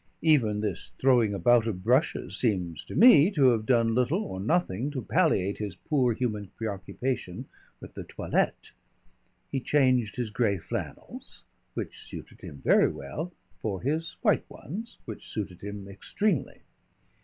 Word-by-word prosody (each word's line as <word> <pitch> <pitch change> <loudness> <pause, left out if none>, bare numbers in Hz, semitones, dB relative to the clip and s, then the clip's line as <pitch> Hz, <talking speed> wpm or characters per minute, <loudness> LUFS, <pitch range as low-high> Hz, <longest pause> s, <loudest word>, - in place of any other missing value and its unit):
Even 120 -10 +3
this 105 -5 -4
throwing 125 -5 +4
about 115 +3 +3
of 95 -5 -3
brushes 130 +7 +1
seems 90 - -1
to - - -8
me 185 - +8
to 145 -10 +4
have 110 -3 0
done 115 -3 +3
little 125 - +1
or 95 - -6
nothing 135 - 0
to 135 -4 -4
palliate 100 - +1
his 105 -4 -4
poor 130 +3 +1
human 105 -5 -2
preoccupation 105 0 -4 0.3
with - - -11
the - - -6
toilette. - - -1 0.8
He 135 - 0
changed 130 -5 +2
his 120 -4 -3
gray 105 -3 +1
flannels - - -7 0.3
which - - -5
suited - - -10
him 70 - -10
very - - +6
well 155 - -6 0.3
for 100 -4 -3
his 155 +5 -1
white - - +2
ones, 220 +9 -8
which - - -8
suited 100 -5 -5
him 100 -1 -7
extremely. 150 - -1
120 Hz, 145 wpm, -28 LUFS, 100-140 Hz, 0.8 s, me